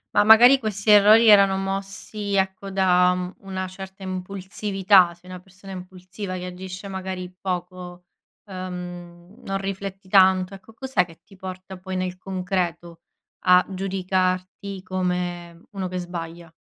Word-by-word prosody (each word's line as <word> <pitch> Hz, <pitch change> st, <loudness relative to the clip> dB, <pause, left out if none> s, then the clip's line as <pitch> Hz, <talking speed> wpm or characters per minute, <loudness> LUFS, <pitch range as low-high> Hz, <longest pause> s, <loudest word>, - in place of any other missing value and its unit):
Ma -, -, +5 dB
magari 240 Hz, +5 st, +8 dB
questi 215 Hz, -3 st, -3 dB
errori 210 Hz, +2 st, +7 dB
erano 200 Hz, -2 st, +6 dB
mossi 195 Hz, +1 st, -4 dB
ecco, 190 Hz, 0 st, -1 dB
da, 180 Hz, -2 st, +3 dB
mhmm, 180 Hz, 0 st, -5 dB
una 190 Hz, -1 st, -4 dB
certa 190 Hz, +1 st, -10 dB
impulsività, 190 Hz, 0 st, +1 dB
sei 175 Hz, +2 st, -18 dB
una 185 Hz, -1 st, -8 dB
persona 190 Hz, +1 st, -14 dB
impulsiva 185 Hz, +1 st, -7 dB
che 180 Hz, 0 st, -6 dB
agisce 185 Hz, +2 st, -8 dB
magari 185 Hz, -1 st, -6 dB
poco, 180 Hz, -1 st, -5 dB, 0.4 s
ehm, 180 Hz, -2 st, -8 dB
non 195 Hz, 0 st, -2 dB
rifletti 195 Hz, 0 st, -6 dB
tanto, 190 Hz, 0 st, +4 dB
ecco 195 Hz, +3 st, -13 dB
cos'è 230 Hz, -6 st, 0 dB
che 165 Hz, -2 st, -17 dB
ti 195 Hz, -, -19 dB
porta 185 Hz, 0 st, -8 dB
poi 185 Hz, +1 st, -6 dB
nel 185 Hz, 0 st, -3 dB
concreto 180 Hz, -3 st, -3 dB, 0.5 s
a 180 Hz, 0 st, +6 dB
giudicarti 185 Hz, 0 st, -2 dB
come 180 Hz, -2 st, -3 dB
uno 195 Hz, -3 st, -4 dB
che 180 Hz, 0 st, -5 dB
sbaglia? 170 Hz, -2 st, -7 dB
185 Hz, 135 wpm, -23 LUFS, 180-195 Hz, 0.5 s, magari